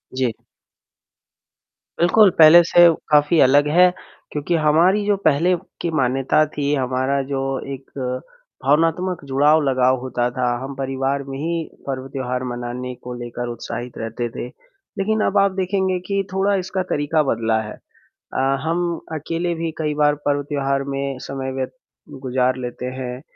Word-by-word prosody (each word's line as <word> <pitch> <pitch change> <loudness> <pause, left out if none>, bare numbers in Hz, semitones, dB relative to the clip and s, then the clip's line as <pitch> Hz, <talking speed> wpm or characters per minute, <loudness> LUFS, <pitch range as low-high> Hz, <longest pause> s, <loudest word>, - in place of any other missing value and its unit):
जी। 130 -3 +1 1.7
बिल्कुल, 195 +4 +6
पहले 160 +2 +9
से 175 +1 +6 0.2
काफ़ी 150 +2 +4
अलग 145 +3 +5
है, 180 +4 +5 0.4
क्योंकि 150 +4 -1
हमारी 165 +6 +3
जो 205 -1 +3
पहले 160 +5 +3 0.3
की 170 - -1
मान्यता 135 +4 +2
थी, 145 -1 -2
हमारा 130 +1 0
जो 135 - -1 0.3
एक 135 0 -11 0.7
भावनात्मक 165 +5 +1
जुड़ाव 150 +3 +4
लगाव 130 -1 +2
होता 125 -1 -1
था, 125 0 -2 0.2
हम 135 +1 -6
परिवार 135 +1 -2
में 135 0 -5
ही 165 +2 -2 0.2
पर्व, 130 -1 -4
त्योहार 125 -2 -3
मनाने 125 +1 -5
को 125 - -6
लेकर 120 0 -5
उत्साहित 120 +1 -6
रहते 115 +1 -4
थे। - - -4 0.5
लेकिन 220 +2 0
अब 200 - +1
आप 200 -1 +4
देखेंगे 190 -1 0
कि 200 -1 0
थोड़ा 195 +1 +2
इसका 190 0 -2
तरीका 150 +1 +1
बदला 110 -1 0
है 105 -1 -7 0.6
अ, - - 0 0.2
हम 170 +1 -1
अकेले 165 +3 -2
भी 165 0 -3
कई 150 -2 -1
बार 150 0 +3
पर्व, 145 0 +1
त्योहार 140 -1 -1
में 135 -1 -3
समय 135 -1 -5
व्य 130 0 -2 0.5
गुज़ार 130 -1 0
लेते 125 0 -5
हैं 125 0 -5
140 Hz, 150 wpm, -21 LUFS, 130-170 Hz, 1.7 s, पहले